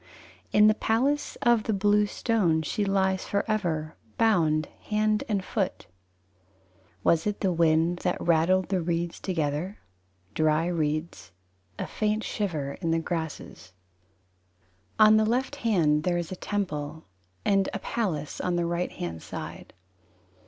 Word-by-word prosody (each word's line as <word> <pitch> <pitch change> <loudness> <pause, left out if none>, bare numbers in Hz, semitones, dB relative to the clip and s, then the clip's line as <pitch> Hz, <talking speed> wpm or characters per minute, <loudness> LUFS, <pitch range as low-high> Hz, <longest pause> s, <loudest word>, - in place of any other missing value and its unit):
"In 210 - +6
the 215 - +6
palace 260 +7 0
of 240 -3 +3
the 220 - 0
blue 205 +1 +3
stone 190 -8 +1
she 205 +7 -1
lies 190 -1 +1
forever 175 -7 -1 0.2
Bound 160 -9 +3 0.2
hand 215 0 +1
and 200 -3 0
foot." 195 -3 -2 1.2
Was 165 +3 +3
it 205 - -2
the 190 -3 +2
wind 165 +1 +2
That 180 - -1
rattled 175 +3 +2
the 190 -2 +1
reeds 170 0 -2
together? 165 +2 -2 0.6
Dry 155 +1 +2
reeds, 155 - -2 0.5
A - - -3
faint 215 +1 -1
shiver 155 -10 -3
in 165 - -1
the 165 - +2
grasses. 160 - -5 1.3
IV 215 - +9
On 215 0 +7
the 215 - +3
left 260 +5 0
hand 170 - +2
there 175 +2 0
is 175 0 -4
a - - -3
temple: 160 -6 -4 0.4
And 195 -1 +3
a - - -3
palace 185 -9 -3
on 180 - 0
the 175 0 0
right 170 +1 -1
hand 80 -2 -5
side. - - -8
180 Hz, 140 wpm, -27 LUFS, 160-210 Hz, 1.3 s, IV